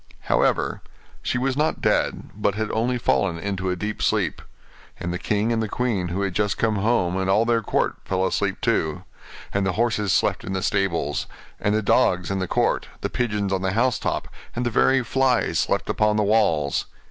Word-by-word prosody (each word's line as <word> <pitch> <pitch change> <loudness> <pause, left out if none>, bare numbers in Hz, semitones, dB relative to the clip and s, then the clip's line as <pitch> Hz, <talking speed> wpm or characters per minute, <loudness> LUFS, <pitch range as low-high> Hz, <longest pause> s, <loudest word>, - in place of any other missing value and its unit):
However, - - +1 0.4
she - - -1
was 130 +1 0
not 150 +2 0
dead, - - 0
but 105 -1 0
had 110 0 -2
only 120 +3 0
fallen 95 -7 +1
into 95 +1 -3
a 90 - 0
deep 105 +4 -4
sleep; - - 0 0.6
and 85 +1 -3
the 90 - -3
king 105 +3 0
and 115 - 0
the 110 - -2
queen, 110 -8 -1
who 90 +4 -2
had 95 -2 -2
just 105 +2 0
come 110 -2 +1
home, 100 -4 +1
and 95 0 -1
all 105 +4 +4
their 115 -1 +2
court, - - 0
fell 95 0 0
asleep - - -1
too; 80 +3 0 0.5
and 100 - +1
the 95 -1 0
horses 110 -3 +1
slept - - +1
in 95 - -4
the 95 -1 -2
stables, 85 -8 0 0.3
and 105 +1 +1
the 110 - 0
dogs 90 -2 +2
in 95 - -1
the 95 - -2
court, - - +1
the - - -2
pigeons 105 -5 -1
on 95 - 0
the 95 0 0
house 120 +2 +2
top, - - -2 0.3
and 120 +1 -1
the 120 - 0
very 130 +4 +3
flies 130 0 +1
slept - - 0
upon 105 0 +2
the 105 - +2
walls. 100 -9 +2
105 Hz, 205 wpm, -23 LUFS, 95-115 Hz, 0.6 s, all